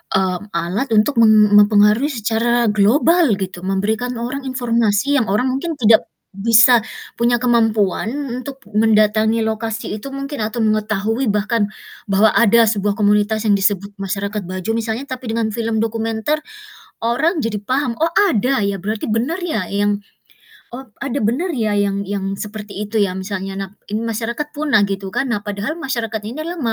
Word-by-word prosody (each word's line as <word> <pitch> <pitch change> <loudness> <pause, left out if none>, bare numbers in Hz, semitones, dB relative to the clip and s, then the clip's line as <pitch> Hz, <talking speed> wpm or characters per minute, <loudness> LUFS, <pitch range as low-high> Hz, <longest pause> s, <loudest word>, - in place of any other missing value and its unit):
mmm, 190 +1 0
alat 205 +9 -1
untuk 230 +4 +2
mem 215 -2 +6
mempengaruhi 210 +5 +4
secara 235 -1 +1
global 265 - +3
gitu, 185 -2 -5
memberikan 220 +6 -1
orang 255 +4 -4
informasi 245 +1 +1
yang 225 - -1
orang 230 +7 +1
mungkin 315 +5 -3
tidak 225 -4 +4 0.3
bisa 230 +4 +5 0.3
punya 240 +1 +1
kemampuan 225 -4 +1 0.3
untuk 275 0 -8
mendatangi 215 +1 +2
lokasi 220 0 -3
itu 275 - -7
mungkin 275 -1 -5
atau 220 +1 -1
mengetahui 215 +3 0
bahkan 210 +1 0 0.4
bahwa 205 +3 +4
ada 235 0 +5
sebuah 205 -2 0
komunitas 210 +1 +2
yang 210 - +4
disebut 200 0 0
masyarakat 200 +2 -3
Bajo 185 +4 -4
misalnya. 230 +3 -3
Tapi 255 -3 -7
dengan 225 -1 -1
film 225 0 -2
dokumenter, 225 +6 -1 0.6
orang 275 +10 0
jadi 225 -5 -2
paham, 255 0 -1
"Oh, 330 - +1 0.2
ada 255 - +1
ya? 200 - -1
Berarti 215 +1 -3
bener 240 +11 -1
ya? 315 - -2
Yang 205 0 0 0.7
oh, 260 +3 -9 0.2
ada 275 0 -2
bener 260 - 0
ya, 215 -2 0
yang 200 -1 0
yang 195 -1 -3
seperti 210 -1 -7
itu 210 0 0
ya?" 190 -1 -1
Misalnya. 195 0 -5
Nah, 195 -1 -4 0.2
ini 220 +2 -2
masyarakat 230 +5 -3
punah, 290 -8 +2
gitu 195 -1 -4
kan. 270 - -1
Nah, 225 -5 -2
padahal 205 +7 -4
masyarakat 235 -9 -3
ini 240 +7 -7
adalah 340 +2 -5
220 Hz, 155 wpm, -18 LUFS, 205-245 Hz, 0.7 s, mem